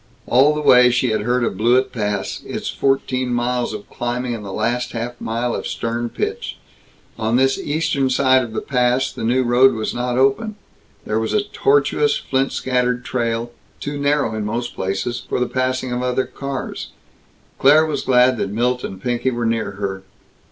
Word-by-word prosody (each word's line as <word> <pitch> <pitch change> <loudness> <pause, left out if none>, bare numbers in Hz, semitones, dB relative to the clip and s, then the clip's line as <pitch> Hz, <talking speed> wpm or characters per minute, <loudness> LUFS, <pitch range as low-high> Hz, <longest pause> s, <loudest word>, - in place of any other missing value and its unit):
All 140 +5 +4
the 150 - -2
way 125 -3 +7
she 125 -1 +1
had 110 -1 0
heard 120 +3 +1
of 100 - -1
Blewett 120 +5 +3
Pass; 105 -4 -2
its - - -5
fourteen 130 -2 0
miles 120 0 0
of 105 -1 -7
climbing, 120 0 -3
and 110 -3 -6
the 100 - -7
last 120 +4 -1
half 120 +1 -5
mile 115 +1 -1
of - - -3
stern 115 +1 -3
pitch. - - -4 0.6
On 110 +1 0
this 135 +1 +3
eastern 145 -3 0
side 130 0 +4
of 115 -3 -6
the - - -2
pass, 125 0 +1
the - - -6
new 125 +3 +2
road 125 +2 +4
was 110 -1 -2
not 125 0 -2
open; 140 - +2 0.5
there 110 +1 0
was 110 - -2
a 210 - +2
tortuous, 435 - +2
flint 135 0 -1
scattered 125 -1 0
trail, 115 -1 -2 0.3
too 145 0 -4
narrow, 140 -5 +1
in 110 -1 -3
most 115 +3 -3
places, 95 +6 -3
for - - 0
the 125 - +2
passing 130 0 -1
of 125 0 -1
other 125 +1 0
cars. 140 -1 -5 0.7
Claire 150 +4 +6
was 155 - -2
glad 125 0 +4
that 100 - -2
Milt 125 +4 0
and 95 - -6
Pinky 125 +1 0
were 120 -2 -2
near 115 -3 -1
her. 95 -1 -4
125 Hz, 185 wpm, -20 LUFS, 115-130 Hz, 0.7 s, way